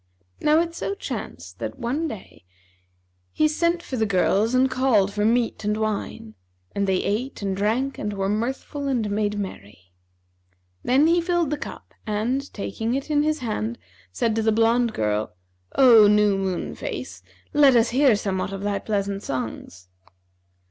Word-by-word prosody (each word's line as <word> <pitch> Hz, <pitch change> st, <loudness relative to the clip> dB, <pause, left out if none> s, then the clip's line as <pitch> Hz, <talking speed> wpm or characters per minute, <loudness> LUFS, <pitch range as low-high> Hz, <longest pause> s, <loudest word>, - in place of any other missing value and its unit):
Now 305 Hz, +1 st, +4 dB
it 335 Hz, 0 st, -3 dB
so 395 Hz, +4 st, -3 dB
chanced -, -, -7 dB
that, -, -, -5 dB
one 270 Hz, +6 st, -2 dB
day, 220 Hz, -, -10 dB, 0.9 s
he 310 Hz, -, +2 dB
sent 340 Hz, +3 st, 0 dB
for 260 Hz, -, -5 dB
the 220 Hz, -1 st, +1 dB
girls 200 Hz, +4 st, +2 dB
and 260 Hz, +1 st, +4 dB
called 255 Hz, -7 st, +2 dB
for 210 Hz, 0 st, -1 dB
meat 230 Hz, 0 st, +1 dB
and 210 Hz, +1 st, 0 dB
wine; 215 Hz, -, -3 dB, 0.4 s
and 200 Hz, 0 st, -1 dB
they 190 Hz, -1 st, +1 dB
ate 225 Hz, +3 st, -2 dB
and 195 Hz, -1 st, -1 dB
drank 230 Hz, +7 st, -1 dB
and 210 Hz, -, -2 dB
were 195 Hz, -1 st, -2 dB
mirthful 260 Hz, +7 st, -3 dB
and 245 Hz, -6 st, 0 dB
made 205 Hz, 0 st, -1 dB
merry 100 Hz, -, -8 dB, 0.9 s
Then 270 Hz, +4 st, +3 dB
he 340 Hz, +2 st, +4 dB
filled 345 Hz, -3 st, 0 dB
the -, -, +1 dB
cup -, -, -9 dB
and, 235 Hz, +7 st, -1 dB
taking 225 Hz, +4 st, -3 dB
it 275 Hz, +3 st, -4 dB
in 290 Hz, -1 st, +3 dB
his 305 Hz, -1 st, 0 dB
hand, 115 Hz, -, -3 dB, 0.3 s
said 220 Hz, -, 0 dB
to -, -, +2 dB
the 220 Hz, 0 st, +2 dB
blonde 230 Hz, +1 st, +2 dB
girl, 105 Hz, -2 st, -1 dB, 0.4 s
'O 230 Hz, -6 st, +8 dB
new 210 Hz, -1 st, +4 dB
moon 190 Hz, -2 st, -2 dB
face, -, -, -6 dB, 0.3 s
let 285 Hz, -3 st, +6 dB
us 230 Hz, 0 st, +4 dB
hear 260 Hz, -2 st, +4 dB
somewhat 195 Hz, -2 st, -2 dB
of 195 Hz, 0 st, -5 dB
thy 205 Hz, -1 st, -1 dB
pleasant 200 Hz, -1 st, -2 dB
songs.' 110 Hz, -, -6 dB
220 Hz, 165 wpm, -24 LUFS, 200-270 Hz, 0.9 s, O